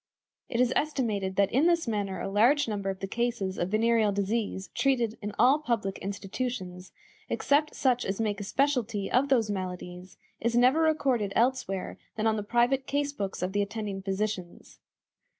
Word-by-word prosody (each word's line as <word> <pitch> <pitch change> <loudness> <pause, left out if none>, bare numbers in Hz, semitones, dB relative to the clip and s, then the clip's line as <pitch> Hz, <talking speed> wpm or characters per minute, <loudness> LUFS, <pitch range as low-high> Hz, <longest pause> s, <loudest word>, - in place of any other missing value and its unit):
It 235 - -2
is 250 0 +3
estimated 215 -11 -1
that 200 0 +2
in 280 +7 +3
this 340 -5 +2
manner 200 -4 -2
a - - -3
large 240 +8 +4
number 200 -3 -2
of 190 -1 -5
the 195 - -2
cases 225 -4 -2
of 175 - -1
venereal 220 0 +3
disease 200 -1 -2
treated 240 -5 +1
in 210 0 -4
all 275 +4 +5
public 230 -9 -2
institutions, 195 -2 -5 0.4
except 300 +2 +1
such 250 -2 +2
as 195 +2 -3
make 210 -2 -1
a - - -4
specialty 235 -3 0
of 270 +3 +3
those 230 -6 +2
maladies, 180 -1 -6 0.2
is 235 +1 0
never 255 +6 +5
recorded 270 -10 +1
elsewhere 235 -6 0 0.2
than 220 - -2
on 220 -1 +3
the 210 - -2
private 240 +5 +1
case 285 0 -1
books 195 -7 -4
of 185 +1 -2
the 205 - +2
attending 205 -1 -4
physicians. 195 -2 -4
220 Hz, 170 wpm, -28 LUFS, 195-250 Hz, 0.4 s, all